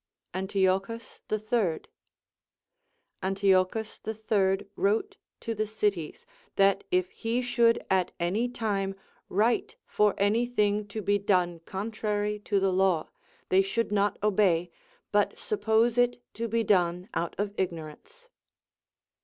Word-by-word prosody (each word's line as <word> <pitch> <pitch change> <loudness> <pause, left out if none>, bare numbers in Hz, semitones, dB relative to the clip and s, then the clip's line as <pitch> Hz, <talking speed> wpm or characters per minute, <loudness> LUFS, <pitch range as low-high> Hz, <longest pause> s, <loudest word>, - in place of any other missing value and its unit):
Antiochus 195 +3 -1
the 215 - 0
Third. 215 -6 -1 1.3
Antiochus 195 +2 +1
the 220 - -5
Third 200 -3 +1
Avrote 220 - +1 0.3
to 230 - -3
the 215 0 -2
cities, 205 - -2 0.3
that 195 0 +3
if 180 0 +1
he 230 +2 -2
should 235 -1 +2
at 185 -1 +1
any 200 +8 0
time 200 -5 -2 0.3
ΛνπΙο 220 - +1
for 210 -1 +2
any 215 +4 +2
thing 210 -3 +1
to 210 +1 -5
be 205 +1 +2
done 180 -4 +1
contrary 210 +1 -2
to 205 -1 0
the 190 -1 +1
law, 185 -4 +2 0.4
they 190 +1 +5
should 205 +3 -1
not 205 0 +1
obey, 185 -5 +2 0.4
but 205 0 +2
suppose 220 +3 +1
it 245 0 +2
to 230 +1 -3
be 230 +1 0
done 180 -3 +2
out 170 - -2
of 205 0 -2
ignorance. 190 - -6
205 Hz, 130 wpm, -28 LUFS, 190-220 Hz, 1.3 s, they